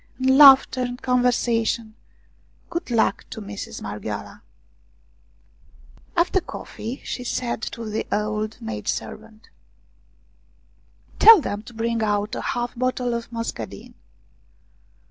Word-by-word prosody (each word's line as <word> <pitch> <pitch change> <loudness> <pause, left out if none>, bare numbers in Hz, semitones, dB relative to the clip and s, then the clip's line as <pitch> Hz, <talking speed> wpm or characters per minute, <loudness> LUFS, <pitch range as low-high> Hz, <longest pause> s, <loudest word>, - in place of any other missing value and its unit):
And 260 +1 +3
laughter 270 -2 +8
and 245 0 -3
conversa 245 -2 +1
tion! 220 -1 -2 0.8
Good 340 -3 -4
luck 230 -2 +1
to 235 - -7
Mistress 205 -1 -7
Marghioala! - - -6 1.8
After 360 +2 +2
coffee 250 -6 -7
she 250 - -4
said 240 -2 -3 0.2
to 230 - -6
the 215 +1 -3
old 215 +1 -2
maidservant: 215 - -6 0.8
" - - -32
Tell 450 -2 +10
them 210 -8 -4
to 235 +2 -14
bring 230 0 -1
out 210 +1 0
a - - -3
half 240 0 -2
bottle 250 0 -1
of 235 0 -5
mus 230 0 -3
cadine." 105 -3 -9
235 Hz, 120 wpm, -23 LUFS, 215-250 Hz, 1.8 s, Tell